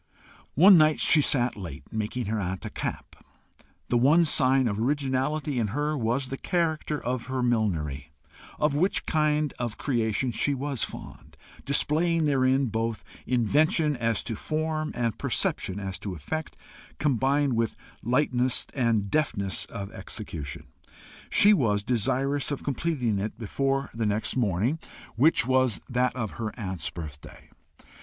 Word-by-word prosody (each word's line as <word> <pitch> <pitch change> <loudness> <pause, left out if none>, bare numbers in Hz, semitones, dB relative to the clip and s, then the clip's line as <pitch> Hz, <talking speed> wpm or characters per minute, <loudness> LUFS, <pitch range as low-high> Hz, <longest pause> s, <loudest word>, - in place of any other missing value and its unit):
One 185 +4 +8
night 155 0 +4
she 155 - +5
sat 125 -4 +2
late, 85 -8 -9
making 110 +3 -2
her 110 +2 -1
aunt 95 -1 -4
a - - -5
cap. - - -5 0.7
The 120 - +3
one 155 +7 +5
sign 135 -3 +3
of 100 -1 -2
originality 135 +2 0
in 110 - +1
her 150 +1 0
was 125 +1 -1
the 135 - -4
character 160 -3 -1
of 125 -1 -3
her 130 -1 -2
millinery, 80 - -1 0.5
of 150 -1 +1
which 175 +7 +1
kind 150 -2 +1
of 120 -3 -3
creation 120 -1 0
she 140 +5 0
was 140 -2 -3
fond, - - -8 0.3
displaying 160 +4 +2
therein 135 -2 +2
both 115 -1 -2 0.2
invention 145 +5 +2
as 115 -3 0
to 115 - -4
form, 155 +3 -2
and 115 -3 -1
perception 95 +2 -1
as 95 -2 -5
to 95 -3 -5
effect, 155 - -5 0.4
combined 140 0 +1
with 115 -1 0 0.3
lightness 125 0 +1
and 115 -6 +1
deftness 100 - -1
of 100 -3 -7
execution. 70 -4 -7 0.6
She 210 +1 +6
was 105 - +1
desirous 130 +5 0
of 145 - -4
completing 135 -7 -1
it 105 +3 -4
before 135 +4 -1
the 115 -1 -1
next 105 +1 -1
morning, 115 - +1 0.4
which 145 +6 +4
was 130 -4 +2
that 125 0 0
of 110 -5 -3
her 110 -1 -2
aunt's 95 -4 -3
birthday. 75 -4 -10
125 Hz, 145 wpm, -27 LUFS, 110-145 Hz, 0.7 s, One